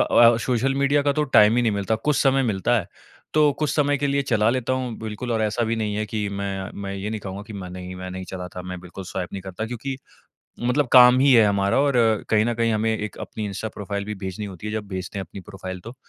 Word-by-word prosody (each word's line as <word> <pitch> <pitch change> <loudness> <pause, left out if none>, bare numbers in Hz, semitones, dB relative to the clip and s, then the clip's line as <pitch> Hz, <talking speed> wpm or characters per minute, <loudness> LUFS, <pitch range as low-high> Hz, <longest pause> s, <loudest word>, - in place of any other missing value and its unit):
अ, 115 -1 +6
social 130 +2 +1
media 140 +1 +2
का 145 0 +2
तो 150 - 0
time 110 -4 +5
ही 120 - +3
नहीं 115 - +2
मिलता। 100 +2 0
कुछ 145 +6 0
समय 135 -1 +3
मिलता 115 0 +1
है, 95 - -4 0.5
तो 150 -1 +5
कुछ 150 -2 0
समय 145 -1 +2
के 145 - 0
लिए 140 0 +1
चला 115 -5 +2
लेता 130 0 -1
हूँ 130 -2 -2
बिल्कुल 110 +3 -4
और 110 -1 +1
ऐसा 110 +2 0
भी 115 +1 -1
नहीं 105 -2 -2
है 110 - -1
कि 105 -2 -2
मैं 100 -1 -4
मैं 100 0 -4
ये 100 +2 -4
नहीं 110 -1 -4
कहूँगा 100 0 -6
कि 110 - -11
मैं 95 -3 -6
नहीं, 90 0 -7
मैं 95 0 -6
नहीं 95 0 -6
चलाता 90 -1 -7
मैं 90 0 -6
बिल्कुल 90 +2 -9
स्वाइप 90 -1 -4
नहीं 95 - -5
करता 95 +3 -5
क्योंकि 125 +3 -5 0.6
मतलब 125 +3 +1
काम 125 0 +8
ही 140 0 +5
है 115 -3 +7
हमारा 100 +1 +2
और 140 -3 +2 0.3
कहीं 110 -1 +4
न 120 +1 0
कहीं 115 0 +1
हमें 110 +1 +1
एक 105 -1 -5
अपनी 110 - -5
इंस्टा 105 +2 -4
प्रोफाइल 100 0 -4
भी 105 +1 -4
भेजनी 95 +1 -5
होती 95 0 -9
है, 105 - -3
जब 110 -2 -4
भेजते 95 +1 -5
हैं 95 - -3
अपनी 95 +3 -10
प्रोफाइल 95 -2 -8
तो। 115 +6 -10
110 Hz, 255 wpm, -23 LUFS, 100-125 Hz, 0.6 s, काम